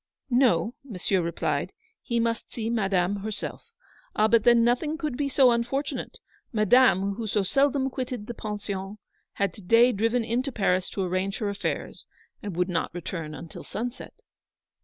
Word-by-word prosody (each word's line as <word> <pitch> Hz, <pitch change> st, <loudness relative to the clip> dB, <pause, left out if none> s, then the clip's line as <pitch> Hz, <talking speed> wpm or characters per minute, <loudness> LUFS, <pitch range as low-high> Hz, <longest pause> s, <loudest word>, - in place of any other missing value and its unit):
No, 240 Hz, -5 st, +3 dB
Monsieur 195 Hz, -6 st, -1 dB
replied, 170 Hz, 0 st, -2 dB, 0.3 s
he 235 Hz, -2 st, -1 dB
must 230 Hz, 0 st, -1 dB
see 225 Hz, -1 st, -3 dB
Madame 195 Hz, -3 st, +1 dB
herself. 210 Hz, +1 st, -5 dB, 0.5 s
Ah, 215 Hz, -, +4 dB
but 225 Hz, 0 st, +3 dB
then 240 Hz, -1 st, +6 dB
nothing 255 Hz, +7 st, +1 dB
could 305 Hz, -5 st, -3 dB
be 280 Hz, +1 st, -1 dB
so 265 Hz, -1 st, +5 dB
unfor 240 Hz, +4 st, +1 dB
tunate. -, -, -5 dB, 0.4 s
Madame, 215 Hz, -3 st, +4 dB
who 220 Hz, +2 st, -5 dB
so 205 Hz, -1 st, +1 dB
seldom 275 Hz, +6 st, +2 dB
quitted 250 Hz, -4 st, -4 dB
the 240 Hz, -, -5 dB
Pension, 205 Hz, -2 st, -5 dB, 0.4 s
had 200 Hz, 0 st, 0 dB
to 210 Hz, -, -11 dB
day 230 Hz, +6 st, +5 dB
driven 230 Hz, +3 st, +1 dB
into 245 Hz, +5 st, -1 dB
Paris 185 Hz, -5 st, +1 dB
to 195 Hz, -, -2 dB
arrange 185 Hz, +2 st, -1 dB
her 210 Hz, -3 st, -2 dB
affairs, 200 Hz, 0 st, -4 dB, 0.3 s
and 200 Hz, -4 st, -5 dB
would 180 Hz, +1 st, +1 dB
not 175 Hz, -3 st, -1 dB
return 165 Hz, -3 st, -5 dB
until 165 Hz, -, -9 dB
sunset. 240 Hz, +3 st, -6 dB
220 Hz, 160 wpm, -26 LUFS, 195-245 Hz, 0.5 s, then